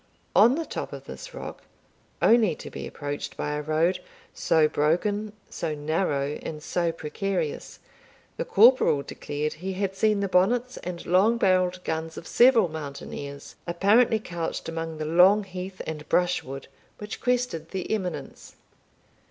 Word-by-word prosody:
On 225 +8 +7
the 330 +1 -2
top - - -5
of - - -8
this - - -9
rock, - - -8 0.6
only 220 -8 +5
to - - -10
be - - -6
approached 145 0 -5
by 150 - -2
a 150 0 -2
road 155 +4 +1 0.3
so 160 -2 +3
broken, 200 +9 0 0.2
so 160 -2 -3
narrow, 145 -2 -1
and 150 -1 -6
so 170 0 0
precarious, 165 +1 -3 0.6
the - - -2
corporal 220 - +5
declared 150 +2 -4
he 190 +3 -5
had 195 0 -2
seen 210 +1 +2
the 200 - 0
bonnets 235 +8 +2
and 175 -1 -6
long 200 +7 +4
barrelled 185 -3 +2
guns 160 0 -3
of - - -8
several 240 -4 +5
mountaineers, 140 -2 -7
apparently 205 +7 +4
couched 170 -5 -4
among 165 -1 -4
the 155 - -3
long 180 +6 +5
heath 185 0 -7
and 155 -1 -6
brushwood 155 -7 0 0.3
which 210 0 -7
crested 245 -11 -1
the 190 -2 -4
eminence. 185 -6 -4
180 Hz, 145 wpm, -26 LUFS, 155-205 Hz, 0.6 s, On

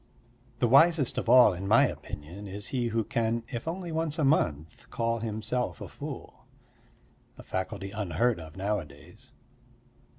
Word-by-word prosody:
The 120 - +2
wisest 145 +2 +5
of - - -4
all, 125 -4 +8
in 95 +2 -5
my 110 +3 +6
opinion, 85 +8 -7
is 100 +2 -6
he 125 -3 -1
who 115 0 0
can, 115 +2 -1
if 120 +1 -5
only 175 +1 -4
once 160 -1 -1
a 155 - 0
month, 80 - 0
call 115 0 -1
himself 110 - -3
a - - -7
fool - - -9 0.9
a - - -11
faculty 95 +1 -4
unheard 105 +2 0
of 80 0 -11
nowadays. 95 -8 -5
115 Hz, 145 wpm, -28 LUFS, 95-125 Hz, 0.9 s, all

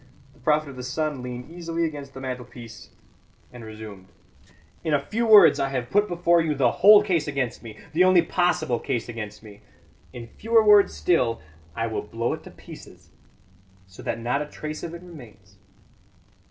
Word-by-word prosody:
The - - -24
prophet 155 0 +1
of 135 -2 -10
the - - -6
sun 145 +2 -3
leaned 125 +3 -8
easily 170 -1 -3
against 145 -4 -7
the - - -7
mantelpiece 125 -3 -8 0.6
and 120 -2 -10
resumed: 110 -3 -10 0.8
"In 160 -3 +1
a - - +2
few 230 +2 -1
words 200 -8 +7
I 135 - 0
have 125 -3 -4
put 205 +1 +3
before 170 -1 +2
you 155 -2 -1
the 130 -4 +2
whole 205 +2 +7
case 175 -7 0
against 140 -5 -3
me 110 -3 -11 0.2
the 175 +4 +4
only 185 -2 +5
possible 175 -8 0
case 125 -5 -3
against 105 -2 -8
me. 105 -1 -14 0.5
In 120 -1 -9
fewer 225 - +1
words 210 -1 +6
still 125 -10 +1 0.4
I 115 - -1
will 110 -1 -3
blow 115 +3 -3
it - - -8
to - - -10
pieces, - - -14 0.7
so 95 0 -14
that - - -4
not 120 +5 -1
a 150 - -5
trace 155 +1 -7
of 170 0 -6
it 170 - -11
remains. 110 - -15
140 Hz, 180 wpm, -24 LUFS, 120-170 Hz, 0.8 s, words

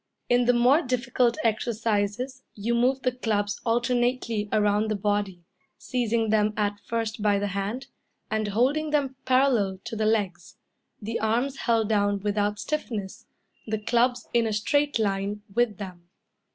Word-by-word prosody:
In 245 0 +4
the 245 - +4
more 250 +6 +5
difficult 250 -3 +1
exercises 225 +2 -1
you 220 +3 -1
move 255 +3 +2
the 255 - +2
clubs 210 -4 -1
alternately 240 -2 0
around 210 0 +2
the 215 - 0
body, 200 -3 -1 0.3
seizing 230 -3 0
them 215 -1 +2
at 205 -1 0
first 225 -1 -3
by 205 -1 +3
the 205 0 -1
hand, 200 +7 -3 0.5
and 215 -1 0
holding 265 +9 +1
them 280 -3 0
parallel 255 -7 +3
to 235 -1 -6
the 215 0 0
legs, 195 -6 -1 0.4
the 225 +2 -3
arms 240 +5 0
held 230 -4 +1
down 205 -2 +2
without 205 0 0
stiffness, 220 -9 -4 0.4
the 220 0 -1
clubs 240 +3 +1
in 235 -1 +3
a 215 - -1
straight 285 +8 +1
line 205 -1 -1
with 235 -3 +1
them. 180 -4 -9
220 Hz, 150 wpm, -26 LUFS, 205-245 Hz, 0.5 s, more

